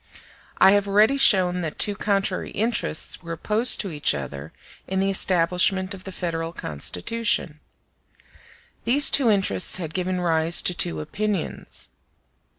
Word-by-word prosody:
I 190 Hz, -, +6 dB
have 205 Hz, 0 st, +1 dB
already 210 Hz, +6 st, +3 dB
shown 180 Hz, -8 st, +4 dB
that 160 Hz, -3 st, -5 dB
two 205 Hz, -, +1 dB
contrary 195 Hz, -2 st, -1 dB
interests 220 Hz, -6 st, -2 dB
were 170 Hz, -1 st, -7 dB
opposed 215 Hz, +8 st, +2 dB
to 195 Hz, -, -6 dB
each 150 Hz, -, 0 dB
other 70 Hz, +2 st, -7 dB, 0.4 s
in 190 Hz, 0 st, -2 dB
the 195 Hz, 0 st, +1 dB
establishment 185 Hz, +1 st, +1 dB
of 190 Hz, -1 st, -12 dB
the 190 Hz, -, -7 dB
Federal 165 Hz, -2 st, -4 dB
Constitution. 150 Hz, -, -3 dB, 1.2 s
These 280 Hz, +5 st, +5 dB
two 265 Hz, -5 st, +3 dB
interests 190 Hz, -, +1 dB
had 165 Hz, -3 st, -6 dB
given 185 Hz, 0 st, -2 dB
rise 165 Hz, -1 st, +1 dB
to 180 Hz, -, +2 dB
two 80 Hz, -, -1 dB
opinions. 205 Hz, -, -4 dB
185 Hz, 140 wpm, -23 LUFS, 165-205 Hz, 1.2 s, I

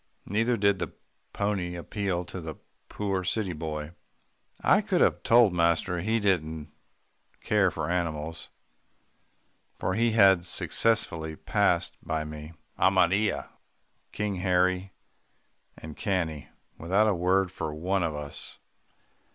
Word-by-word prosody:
Neither 115 Hz, +4 st, +1 dB
did 100 Hz, -1 st, +2 dB
the -, -, -4 dB, 0.4 s
pony 95 Hz, -4 st, -2 dB
appeal 90 Hz, 0 st, -3 dB
to 90 Hz, -, -7 dB
the 80 Hz, -2 st, -6 dB, 0.3 s
poor 95 Hz, -3 st, -2 dB
city 95 Hz, 0 st, -1 dB
boy. 75 Hz, -1 st, -5 dB, 0.7 s
I -, -, +4 dB
could -, -, 0 dB
have -, -, +3 dB
told 115 Hz, -5 st, +5 dB
master 85 Hz, +1 st, +1 dB
he 110 Hz, +5 st, +1 dB
didn't 80 Hz, -6 st, -1 dB, 0.7 s
care -, -, +3 dB
for 75 Hz, -, -4 dB
animals, 80 Hz, -2 st, -3 dB, 1.3 s
for 95 Hz, -, -1 dB
he 115 Hz, +2 st, +2 dB
had 95 Hz, -5 st, +6 dB
successively 85 Hz, -8 st, +1 dB
passed -, -, 0 dB
by 80 Hz, 0 st, -2 dB
me, 75 Hz, +1 st, -8 dB, 0.3 s
Amarilla, 95 Hz, +2 st, +2 dB, 0.6 s
King 105 Hz, -2 st, -2 dB
Harry, 90 Hz, +1 st, +1 dB, 0.9 s
and 80 Hz, -1 st, -9 dB
Cannie, 85 Hz, -7 st, -2 dB, 0.3 s
without 95 Hz, +6 st, +2 dB
a 105 Hz, -, +3 dB
word 90 Hz, +1 st, +1 dB
for 75 Hz, -, -4 dB
one 90 Hz, +6 st, -1 dB
of 80 Hz, -3 st, -1 dB
us. 75 Hz, -1 st, -7 dB
90 Hz, 120 wpm, -27 LUFS, 80-100 Hz, 1.3 s, had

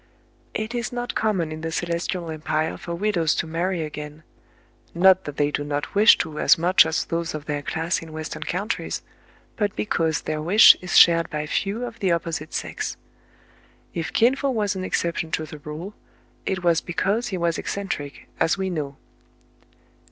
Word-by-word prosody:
It 220 Hz, +2 st, -3 dB
is 240 Hz, -2 st, -2 dB
not 245 Hz, 0 st, -3 dB
common 190 Hz, -8 st, 0 dB
in 155 Hz, 0 st, -6 dB
the 165 Hz, 0 st, -3 dB
Celestial 170 Hz, 0 st, -2 dB
Empire 155 Hz, 0 st, -1 dB
for 170 Hz, -, -6 dB
widows 170 Hz, -5 st, +1 dB
to -, -, -1 dB
marry 170 Hz, +2 st, -1 dB
again, 150 Hz, 0 st, -7 dB, 0.4 s
— -, -, -34 dB, 0.3 s
not 190 Hz, +1 st, +5 dB
that 145 Hz, -1 st, -7 dB
they 145 Hz, 0 st, +2 dB
do 145 Hz, -, -2 dB
not 145 Hz, 0 st, -3 dB
wish 210 Hz, +3 st, +7 dB
to 155 Hz, -2 st, -7 dB
as -, -, +5 dB
much 175 Hz, 0 st, +5 dB
as 160 Hz, -, -1 dB
those 165 Hz, -1 st, -3 dB
of 150 Hz, -1 st, -6 dB
their 145 Hz, -1 st, -2 dB
class 165 Hz, +5 st, -1 dB
in 165 Hz, -1 st, -10 dB
West 155 Hz, 0 st, -5 dB
ern -, -, -9 dB
countries, 205 Hz, +6 st, -3 dB, 0.5 s
but 205 Hz, -2 st, 0 dB
because 165 Hz, -7 st, 0 dB
their 155 Hz, -1 st, -3 dB
wish 195 Hz, +8 st, +8 dB
is 180 Hz, -1 st, +1 dB
shared 165 Hz, -1 st, +7 dB
by 150 Hz, 0 st, -3 dB
few 200 Hz, +9 st, -2 dB
of 235 Hz, -2 st, -9 dB
the 190 Hz, -3 st, +1 dB
opposite 165 Hz, -2 st, -2 dB
sex. -, -, -4 dB, 1.0 s
If 165 Hz, -1 st, -3 dB
Kin 240 Hz, +4 st, +4 dB
Fo 275 Hz, 0 st, -1 dB
was 210 Hz, -5 st, 0 dB
an 185 Hz, -, -4 dB
exception 170 Hz, -3 st, -1 dB
to 155 Hz, -, 0 dB
the 150 Hz, 0 st, -10 dB
rule, 155 Hz, +7 st, -7 dB, 0.5 s
it 190 Hz, -1 st, -1 dB
was 170 Hz, -2 st, +3 dB
because 195 Hz, +7 st, -1 dB
he 190 Hz, -, -3 dB
was 170 Hz, -1 st, 0 dB
ec -, -, -7 dB
centric, 145 Hz, -8 st, -4 dB
as 165 Hz, -, +2 dB
we 190 Hz, -1 st, -2 dB
know. 145 Hz, -5 st, -4 dB
170 Hz, 190 wpm, -24 LUFS, 155-195 Hz, 1.0 s, wish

